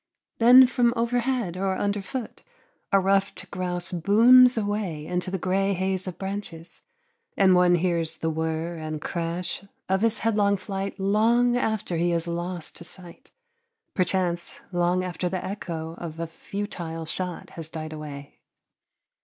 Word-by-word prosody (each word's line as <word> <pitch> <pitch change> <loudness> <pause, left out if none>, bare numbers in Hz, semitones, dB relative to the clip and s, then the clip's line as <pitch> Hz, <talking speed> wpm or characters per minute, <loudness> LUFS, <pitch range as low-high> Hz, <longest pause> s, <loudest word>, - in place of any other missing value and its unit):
Then 250 +3 +9
from 245 -1 +2
overhead 235 -4 0
or 190 0 0
underfoot 205 +4 -3 0.5
a 195 - +5
ruffed 195 -1 0
grouse 180 -1 -3
booms 235 +8 +6
away 205 -8 -2
into 180 +2 -2
the 190 - -2
gray 195 +2 +1
haze 190 0 -1
of 180 - -5
branches, 190 -4 -6 0.5
and 190 -2 +5
one 180 0 +5
hears 170 -2 0
the 160 - -1
whirr 160 +1 -2
and 155 -1 -4
crash 170 +4 -3 0.2
of 190 +1 +1
his 230 0 +2
headlong 205 -2 +3
flight 195 0 -5
long 230 +5 +3
after 220 -7 -1
he 175 +1 +1
is 170 0 -1
lost 175 0 -4
to - - -8
sight, 175 -1 -10 0.6
perchance 180 -2 -1
long 175 +1 +1
after 180 0 -2
the 185 0 -3
echo 165 -5 -5
of 165 -1 -7
a 165 - -1
futile 165 -2 -6
shot 180 +2 -5
has 160 -2 -7
died 155 -1 -6
away. 145 -2 -9
185 Hz, 145 wpm, -25 LUFS, 170-200 Hz, 0.6 s, Then